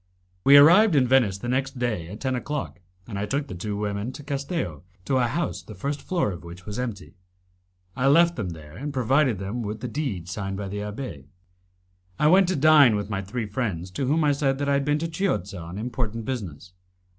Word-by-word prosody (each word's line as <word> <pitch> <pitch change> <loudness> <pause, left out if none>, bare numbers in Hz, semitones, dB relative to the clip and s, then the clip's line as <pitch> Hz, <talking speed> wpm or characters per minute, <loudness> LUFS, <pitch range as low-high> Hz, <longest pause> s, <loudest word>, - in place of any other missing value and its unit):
We 140 +1 +8
arrived 175 +6 +7
in 130 -3 +4
Venice 120 -7 +3
the 120 - -7
next 135 +2 -1
day 115 -9 -2
at 105 +5 -9
ten 130 -1 -1
o'clock, 125 - -4 0.3
and 100 -4 -5
I 105 - -2
took 140 +5 -1
the - - -7
two 100 +3 -4
women 105 +3 -2
to 145 - -9
Castello, 140 - -3 0.2
to 135 - +1
a 125 -2 +2
house 155 +8 -2
the 110 - -11
first 140 +9 -3
floor 170 - 0
of 90 -1 -8
which 85 +1 -11
was 105 +3 -5
empty. 115 -6 -5 0.8
I 130 - +1
left 170 +4 +5
them 105 -6 -3
there, 80 -2 -10
and 145 +8 -5
provided 130 -3 +2 0.2
with 105 +1 -5
the - - -3
deed 115 - -3
signed 95 +1 -4
by 100 -1 -4
the 100 - -5
abbé 105 - -6 0.9
I - - +1
went 185 +4 +6
to 185 - 0
dine 145 -6 +6
with 105 +1 -3
my 95 -1 -1
three 110 +4 -4
friends, 100 -5 -3
to 130 +8 -2
whom 155 +4 +2
I 150 - +4
said 140 -1 +1
that 145 0 -2
I - - +3
had 140 0 +1
been 145 0 +2
to 165 +2 -2
Chiozza 105 - -2
on 85 +3 -8
important 115 -1 -3
business. 90 - -5
120 Hz, 215 wpm, -25 LUFS, 100-140 Hz, 0.9 s, We